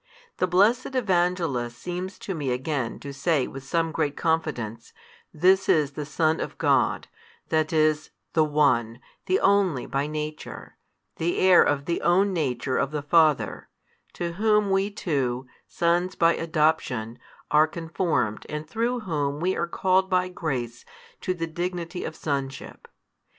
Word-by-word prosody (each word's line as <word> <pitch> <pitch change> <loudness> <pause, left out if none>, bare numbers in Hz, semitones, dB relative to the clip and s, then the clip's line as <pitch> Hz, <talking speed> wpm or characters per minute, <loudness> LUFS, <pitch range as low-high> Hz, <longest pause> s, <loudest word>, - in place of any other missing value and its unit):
The 185 - +1
blessed 215 +9 +2
Evangelist 175 - 0
seems 180 +4 -5
to 195 - -5
me 145 -6 -3
again 125 -1 -2
to 140 - -7
say 140 0 +1
with 135 0 -8
some 165 +4 0
great 150 -3 -1
confidence, 125 -9 -2 0.4
This 190 +4 +3
is 150 -3 +3
the 145 0 -6
Son 155 +1 +1
of - - -5
God, - - +2 0.4
that 155 -1 +1
is, 155 -1 +2 0.2
the 160 - +4
One, 140 -7 +2 0.3
the 185 - +3
Only 195 -9 +2
by 140 +1 -1
Nature, 150 0 -6 0.4
the 170 +2 -1
Heir 185 -1 +6
of 140 -1 +1
the 170 - -1
Own 190 +3 +3
Nature 130 -5 -1
of 140 - +1
the 150 -1 -4
Father, 155 -1 +2 0.4
to 170 -1 -3
Whom 210 +1 +2
we 195 +1 +2
too, 135 - -2 0.2
sons 175 +2 0
by 165 0 +4
adoption, 150 -8 0 0.3
are 150 +1 +5
conformed 160 - -2
and 150 +1 -5
through 235 +7 -1
Whom 145 -7 -2
we 185 +3 0
are 170 - -1
called 190 +2 +1
by 185 -1 +1
grace 125 -9 -4 0.4
to 185 - -2
the 165 -1 -2
dignity 175 +1 -4
of - - -5
sonship. 140 -2 -4
160 Hz, 150 wpm, -25 LUFS, 140-180 Hz, 0.4 s, Heir